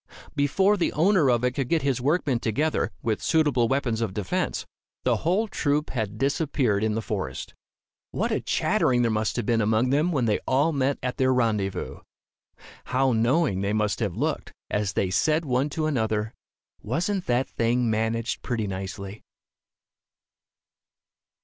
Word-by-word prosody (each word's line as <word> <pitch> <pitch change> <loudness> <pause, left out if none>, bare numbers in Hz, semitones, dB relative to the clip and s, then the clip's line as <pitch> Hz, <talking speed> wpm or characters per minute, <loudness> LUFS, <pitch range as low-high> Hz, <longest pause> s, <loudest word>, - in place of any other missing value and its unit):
Before 190 +9 +3
the 175 - +1
owner 170 -3 +3
of 120 -1 +2
it 125 - +2
could 130 -1 -3
get 165 -3 +1
his 135 -3 0
workmen 140 -3 +1
together, 145 +8 0
with 110 -2 -1
suitable 145 -7 +2
weapons 125 -4 0
of 100 -5 -2
defence, 100 -4 -2 0.4
the - - +2
whole 190 +7 +1
troop 150 -6 -1
had 110 -1 -3
disappeared 135 -5 0
in 110 -1 0
the 110 - -2
forest. 95 -13 -4 0.6
What - - -2
a - - 0
chattering 125 -1 +1
there 115 - +2
must 110 -3 -1
have - - -2
been 115 0 +2
among 110 +4 +2
them, 150 +6 +2
when 135 -7 +1
they 105 -2 +1
all 140 +5 +3
met 140 0 +1
at 125 0 -2
their 130 0 +3
rendezvous! 110 -6 -1 0.9
How 130 +1 +1
knowing 115 - +2
they 100 +1 -1
must 105 -1 0
have 105 -7 -2
looked, - - -2 0.2
as 105 -2 0
they 95 0 0
said 155 - +2
one 130 +2 +1
to 155 +1 -2
another, 110 -6 -1 0.5
"Wasn't 180 - -2
that 125 +2 +1
thing 120 +1 0
managed 115 +1 -1
pretty 115 -3 -2
nicely?" 95 +1 -6
125 Hz, 160 wpm, -25 LUFS, 110-145 Hz, 0.9 s, Before